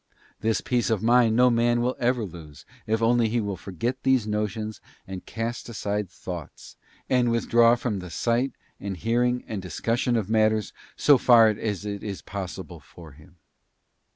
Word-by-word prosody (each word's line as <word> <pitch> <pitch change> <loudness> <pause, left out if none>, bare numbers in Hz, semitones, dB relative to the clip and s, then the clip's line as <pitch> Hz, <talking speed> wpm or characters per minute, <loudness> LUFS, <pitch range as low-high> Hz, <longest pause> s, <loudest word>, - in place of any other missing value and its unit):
This 110 0 0
peace 120 -2 0
of 110 -2 0
mind 115 -1 +4
no 125 +1 +5
man 120 0 +2
will 125 +2 0
ever 125 -2 +1
lose, 80 -5 -12 0.2
if 110 +1 0
only 115 -1 +3
he 120 +2 0
will 100 -3 -2
forget 100 +8 -4
these 130 -4 +2
notions 105 0 -3 0.2
and 95 -1 -8
cast 115 +2 -4
aside 105 -3 -3
thoughts, 90 -4 -9 0.3
and 125 -2 +2
withdraw 115 0 +4
from 120 -4 -3
the 90 -1 -8
sight, 120 +9 0 0.3
and 100 -2 -5
hearing, 120 +4 0
and 105 -3 -5
discussion 115 +6 -1
of 110 -5 0
matters 110 -1 +1 0.2
so 145 -3 +5
far 115 -3 +6
as 105 -1 -3
it 100 -1 -4
is 100 -3 -6
pos 95 -2 -6
sible 90 -4 -9
for 80 +4 -14
him. 75 +6 -18
110 Hz, 170 wpm, -25 LUFS, 100-120 Hz, 0.3 s, far